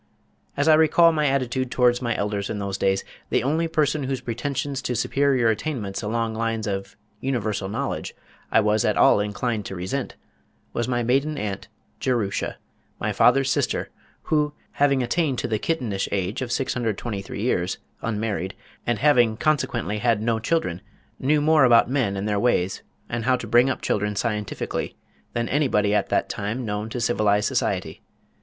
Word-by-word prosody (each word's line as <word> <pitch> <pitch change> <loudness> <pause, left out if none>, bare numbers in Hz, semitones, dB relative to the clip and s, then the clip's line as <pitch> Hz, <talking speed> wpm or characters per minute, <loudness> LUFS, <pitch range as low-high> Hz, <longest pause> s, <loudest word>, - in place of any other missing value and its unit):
As 145 +2 +1
I 160 - +8
recall 160 +2 +6
my 150 -2 +1
attitude 130 -1 0
towards 125 0 +3
my 120 -2 -1
elders 100 -1 -2
in 105 - -3
those 100 -1 -3
days, 95 0 +1 0.3
the - - +1
only 160 +5 +1
person 155 -3 +1
whose 135 -1 -2
pretensions 135 +3 -3
to 125 - -2
superior 135 -1 +2
attainments 110 -4 -2
along 115 +1 -1
lines 115 -1 -1
of 95 -1 -4 0.2
universal 110 -7 -2
knowledge - - -3 0.4
I - - +5
was 105 0 +2
at - - +1
all - - +6
inclined 105 +2 -1
to 95 - -6
resent, 95 +10 -3 0.6
was 120 - -1
my 120 -1 0
maiden 135 +5 +1
aunt, 100 -4 -4 0.3
Jerusha, 115 -6 -1 0.4
my - - -1
father's 135 +2 +4
sister, - - 0 0.3
who, 150 -1 +1 0.2
having 140 -2 +2
attained 135 +2 0
to - - -1
the 110 -2 -1
kittenish 115 -12 -1
age 100 +4 -1
of 125 -2 -3
623 115 -6 -2
years, 95 -5 0 0.2
unmarried, 105 -4 -2 0.3
and 120 -2 +1
having 120 -6 +4
consequently 120 -7 0
had 115 -1 +2
no 110 +1 0
children, 110 - -1 0.4
knew 150 +3 +2
more 155 -1 +5
about 120 -1 +5
men 120 -8 0
and 100 +2 -2
their 105 -1 +1
ways, 95 -5 +1 0.3
and 120 -1 -3
how 130 0 +4
to - - -5
bring 120 +3 +4
up 130 - -3
children 105 0 0
scientifically 105 -1 -3 0.4
than 120 -1 -1
anybody 105 -8 +2
at 105 - +1
that - - +1
time 110 +5 -3
known 105 +1 -3
to 125 - -4
civilized 105 -3 +2
society. - - -1
120 Hz, 165 wpm, -24 LUFS, 105-135 Hz, 0.6 s, I